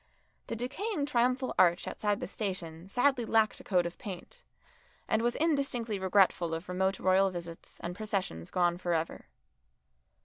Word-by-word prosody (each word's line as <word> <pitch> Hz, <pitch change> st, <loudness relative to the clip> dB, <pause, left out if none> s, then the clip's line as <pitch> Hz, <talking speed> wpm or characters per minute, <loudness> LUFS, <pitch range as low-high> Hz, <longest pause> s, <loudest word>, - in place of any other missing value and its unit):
The -, -, -3 dB
decaying 295 Hz, -, -2 dB
triumphal 255 Hz, -1 st, +1 dB
arch 175 Hz, 0 st, +4 dB
outside 205 Hz, -1 st, -1 dB
the -, -, -3 dB
station 185 Hz, -4 st, -5 dB
sadly 245 Hz, +4 st, +2 dB
lacked 220 Hz, -1 st, +2 dB
a -, -, -11 dB
coat 180 Hz, -3 st, +2 dB
of 170 Hz, -, -5 dB
paint, 185 Hz, -4 st, -8 dB, 0.6 s
and 220 Hz, -, +2 dB
was 240 Hz, +1 st, +1 dB
indistinctly 275 Hz, -9 st, 0 dB
regretful 185 Hz, -3 st, +3 dB
of 165 Hz, +2 st, -7 dB
remote 190 Hz, +2 st, 0 dB
royal 190 Hz, +1 st, +4 dB
visits 170 Hz, -2 st, -8 dB
and 175 Hz, +1 st, -4 dB
processions 195 Hz, -, -3 dB
gone 175 Hz, -1 st, +1 dB
for 175 Hz, -2 st, 0 dB
ever. 160 Hz, 0 st, -3 dB
195 Hz, 150 wpm, -31 LUFS, 175-235 Hz, 0.6 s, arch